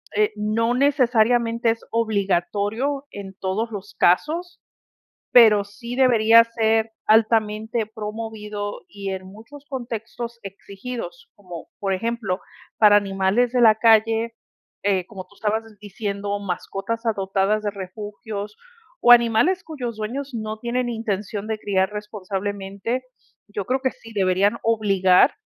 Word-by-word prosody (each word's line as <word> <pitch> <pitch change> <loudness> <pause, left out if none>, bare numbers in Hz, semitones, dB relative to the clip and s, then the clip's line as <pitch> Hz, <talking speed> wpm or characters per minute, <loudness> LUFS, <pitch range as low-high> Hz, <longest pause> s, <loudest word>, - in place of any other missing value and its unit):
eh, 210 0 +3
no 220 +3 0
necesariamente 240 -4 +2
es 225 - -6
obligatorio 220 +5 0
en 195 -1 -9
todos 210 +5 -2
los 205 -1 -8
casos, 325 - +1 0.7
pero 215 -4 +7
sí 235 +4 -8
debería 230 -3 +6
ser 225 -1 0
altamente 220 0 +2
promovido 210 -1 -6
y 195 +1 -5
en 190 0 -6
muchos 230 +9 -13
contextos 235 -2 -6
exigidos, 235 - -8
como 180 -4 -10
por 195 -1 -1
ejemplo, 210 -2 -2 0.4
para 210 -1 +7
animales 200 +4 +1
de 245 - +2
la 220 -2 +7
calle, 225 +1 +3 0.5
eh, 190 -3 +1
como 190 -3 -8
tú 205 - -23
estabas 220 +2 -1 0.2
diciendo, 205 0 -4
mascotas 200 +4 -4
adoptadas 200 0 0
de 205 - 0
refugios 205 +2 -7 0.5
o 245 - +6
animales 240 - +5
cuyos 250 -8 -6
dueños 260 +5 -4
no 215 -1 -4
tienen 240 +1 -1
intención 210 -2 -3
de 220 -1 -3
criar 190 -1 0
responsablemente, 205 +2 -4 0.4
yo 205 -2 -5
creo 260 +3 0
que 260 - +1
sí 230 - -15
deberían 195 +3 +2
obligar, 200 -1 +4
215 Hz, 125 wpm, -23 LUFS, 200-235 Hz, 0.7 s, pero